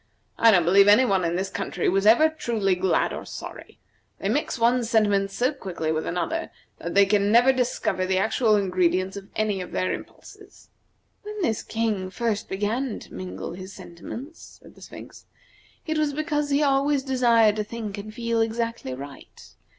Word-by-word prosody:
I 230 - +7
don't 180 -6 +4
believe 195 +3 +5
any 210 +6 +6
one 195 -5 +1
in 170 0 0
this 190 +2 -2
country - - -3
was 195 +2 +2
ever 240 +9 +7
truly 230 -11 -1
glad 185 +1 +1
or - - -6
sorry. - - -9 0.4
They 195 - -3
mix 280 +5 -1
one 240 +1 +2
sentiment 210 -4 +2
so 250 +8 0
quickly 175 - -4
with 160 0 -2
another 175 -1 -2 0.3
that 170 +2 -5
they 200 0 +7
never 210 +5 +4
can 265 - +3
discover 235 -6 -1
the 190 0 +1
actual 220 +2 +2
ingredients 185 -1 +1
of 200 -1 -8
any 210 -3 -1
of 180 - -8
their 185 - 0
impulses." - - -12 0.5
"When 420 0 -8
this 220 -8 0
King 215 -5 -2
first 220 +1 -2
began 215 +5 -2
to - - -13
mingle 95 - -6
his 185 +2 -9
sentiments," 245 - -10
said - - -17
the - - -19
Sphinx, - - -12 0.6
"it 315 -1 -1
was 300 -2 0
because 295 -1 -1
he 285 +1 +2
always 275 0 +2
desired 235 -5 +3
to 215 - 0
think 210 -2 -6
and 215 +1 -8
feel 230 0 -1
exactly 225 - -2
right. 140 +1 -12
215 Hz, 180 wpm, -24 LUFS, 190-245 Hz, 0.6 s, I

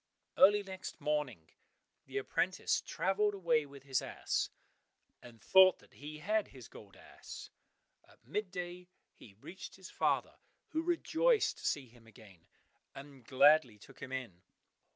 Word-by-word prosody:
Early 205 +2 +6
next 190 -1 -8
morning 145 - -2 0.6
the - - -5
apprentice - - 0
travelled 205 +2 0
away 165 -6 +1
with 140 -1 -13
his 135 -2 0
ass, - - -2 0.7
and 120 -2 -14
thought 190 +6 +6
that - - -23
he 150 +1 -9
had 210 +6 0
his 130 -4 -13
gold 100 -2 -14
ass. - - -11 0.6
At - - -24
mid 200 - -3
day 180 0 -6 0.3
he 100 - -16
reached 175 - -10
his 190 -1 -12
father, - - 0 0.3
who 320 0 -1
rejoiced 355 +7 +2
to - - -9
see 140 -3 -1
him 115 -1 -20
again, 105 -7 -17 0.5
and 135 -2 -11
gladly 135 -2 +5
took 100 - -16
him 130 -1 -7
in. 120 -10 -6
150 Hz, 145 wpm, -34 LUFS, 125-190 Hz, 0.7 s, Early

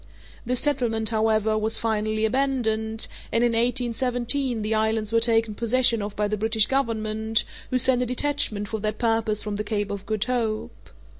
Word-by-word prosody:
This 250 0 +1
settlement, 235 -7 +1
however, 220 -1 +1
was 220 +1 +1
finally 215 -1 0
abandoned, 220 -3 0 0.2
and 230 - +2
in 240 - +3
1817 245 +1 0
the 215 +1 -1
islands 220 0 0
were 230 - +5
taken 225 -1 +2
possession 235 0 +2
of 205 0 -5
by 210 0 0
the 210 +1 -2
British 220 0 +3
Government, 220 -4 0 0.3
who 255 - +1
sent 255 0 +4
a 250 - 0
detachment 250 -5 -1
for 220 +2 -4
that 215 0 -2
purpose 225 -2 0
from 210 -1 -4
the 210 - -2
Cape 205 -1 -2
of 200 -1 -6
Good 215 -1 0
Hope. 230 -4 -3
225 Hz, 170 wpm, -24 LUFS, 215-240 Hz, 0.3 s, were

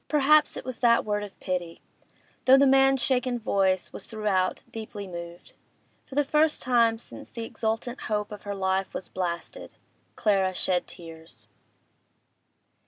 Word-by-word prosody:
Perhaps 300 +1 +4
it - - -7
was 255 -2 -6
that 235 -2 +4
word 205 -1 -1
of 205 - -10
pity—though 180 +8 -1
the 280 - +5
man's 270 -1 +4
shaken 255 -1 +1
voice 195 -4 0
was - - -6
throughout 205 -4 -1
deeply 215 -2 -7
moving. 170 -1 -8 0.7
For 265 - -10
the 290 - +3
first 300 +2 +2
time 235 -2 +3
since 225 - -10
the 230 -1 -5
exultant 225 +2 -3
hope 210 -1 -2
of 210 - -8
her 205 0 -5
life 190 0 -1
was 185 - -5
blasted, 175 -2 -5 0.4
Clara 195 -4 +1
shed 180 -1 0
tears. 160 -9 -12
210 Hz, 145 wpm, -26 LUFS, 185-250 Hz, 0.7 s, the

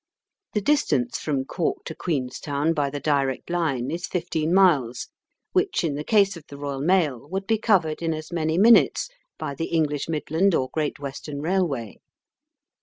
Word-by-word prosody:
The 210 - 0
distance 155 - +1
from 140 -3 -1
Cork 170 +4 -2
to 160 - -5
Queenstown 145 0 -1
by 145 -3 0
the 145 +1 -5
direct 140 +1 0
line 140 -7 0
is 170 +2 -3
fifteen 160 -3 -2
miles, 150 -11 +3 0.4
which 375 - +1
in 160 -4 0
the 145 +1 -4
case 200 +1 +3
of 170 - -10
the 140 - -10
Eoyal 140 -1 -4
mail 150 -7 +1
would 195 +2 -3
be 220 +1 +1
covered 175 -9 +2
in 165 -1 0
as 155 +1 -5
many 160 -1 0
minutes 230 - +5 0.3
by 140 - -4
the 165 +4 -3
English 150 -3 -1
Midland 165 +4 +1
or 130 -1 -1
Great 155 -2 -1
Western 140 +1 -6
Rail 180 +4 +1
way. 120 -8 -6
155 Hz, 175 wpm, -24 LUFS, 140-180 Hz, 0.4 s, minutes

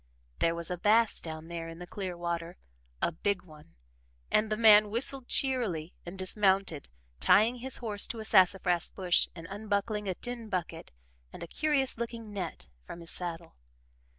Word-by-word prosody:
There 165 0 +2
was 170 +1 -5
a 180 - -3
bass 220 +3 +3
down 160 -1 -6
there 165 -1 -5
in 165 - -9
the 180 - -8
clear 185 -1 -5
water 170 0 -3 0.5
a - - +3
big 185 +3 -1
one 150 - -17 0.6
and 215 0 +3
the 215 - +1
man 215 -2 +7
whistled 245 +3 -2
cheerily 215 - 0
and 180 +3 -7
dismounted, 190 -4 +1 0.3
tying 220 - +5
his 260 +2 -2
horse 210 -4 -1
to 230 - -5
a 220 - -6
sassafras 180 -3 +4
bush 180 -2 +1
and 165 -2 -9
unbuckling 205 0 -2
a 185 - -1
tin 240 0 -6
bucket 170 -4 -4 0.4
and - - -8
a - - -6
curious 275 - 0
looking 230 -2 -5
net 170 - -5 0.2
from 170 - -9
his 165 - -4
saddle. 170 -2 -5
195 Hz, 170 wpm, -30 LUFS, 170-220 Hz, 0.6 s, man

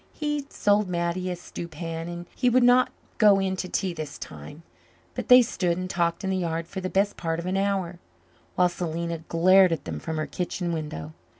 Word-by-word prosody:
He 295 -2 -2
sold 205 -1 +2
Mattie 175 +1 -1
a 180 - -2
stew 175 -1 -8
pan 165 0 -5
and 175 0 -6
he 250 - +2
would 250 +1 +4
not 245 +1 +5 0.3
go 205 -2 +6
in 190 -1 0
to 185 - -4
tea 190 -3 -1
this 155 -3 -6
time, 75 - -10 0.5
but - - -5
they 250 0 +9
stood 180 -6 -1
and 185 0 -3
talked 170 -1 -1
in 190 - -1
the 190 - 0
yard 165 -2 -2
for 190 +2 -6
the 185 - -3
best 200 +2 +1
part 165 -1 -2
of 170 - -5
an 185 +1 -1
hour, 195 -3 -1 0.6
while 180 - +4
Selena 170 -1 -3
glared 180 +3 +4
at 155 -4 -2
them - - -4
from 160 -1 -4
her 155 - -1
kitchen 175 -1 -3
window. 115 - -5
175 Hz, 210 wpm, -26 LUFS, 165-195 Hz, 0.6 s, they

